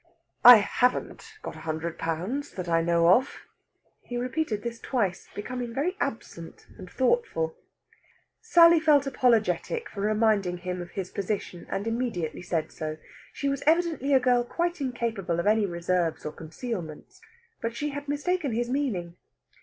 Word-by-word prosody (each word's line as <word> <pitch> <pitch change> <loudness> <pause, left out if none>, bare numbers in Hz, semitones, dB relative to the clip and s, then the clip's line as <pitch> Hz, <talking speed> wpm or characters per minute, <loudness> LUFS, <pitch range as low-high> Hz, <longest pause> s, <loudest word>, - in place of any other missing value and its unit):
I 245 0 +12
haven't 250 - 0
got - - -6
a - - -10
hundred 160 +1 -4
pounds, 180 - -3
that 185 -2 -5
I 165 -1 +2
know 170 0 +3
of." 250 +9 +3 0.6
He 245 - -6
repeated 245 -3 -2
this 235 -1 -5
twice, 205 -9 -2
becoming 240 +2 -5
very 330 +8 0
absent 195 -10 -5
and 185 -1 -9
thoughtful. 255 - 0 0.9
Sally 340 -6 +6
felt 300 -3 +4
apologetic 245 - +1
for 200 - -7
reminding 210 -4 +2
him 180 0 -4
of 175 - -8
his 185 0 -5
position, 195 -3 -4
and 195 - -3
immediately 225 -9 -2
said 170 -3 -2
so. 155 0 -5 0.3
She 280 - -3
was 275 0 -1
evidently 320 -4 +2
a 270 - +6
girl 245 -1 +3
quite 345 +6 -2
incapable 230 -9 -2
of 170 - -1
any 215 0 +3
reserves 170 -1 -1
or 150 - -3
concealments. 165 - -7 0.4
But 230 0 -3
she 295 +4 -2
had 285 0 -6
mistaken 290 -1 -1
his 240 +2 -1
meaning. 190 -12 -2
225 Hz, 155 wpm, -27 LUFS, 175-275 Hz, 0.9 s, I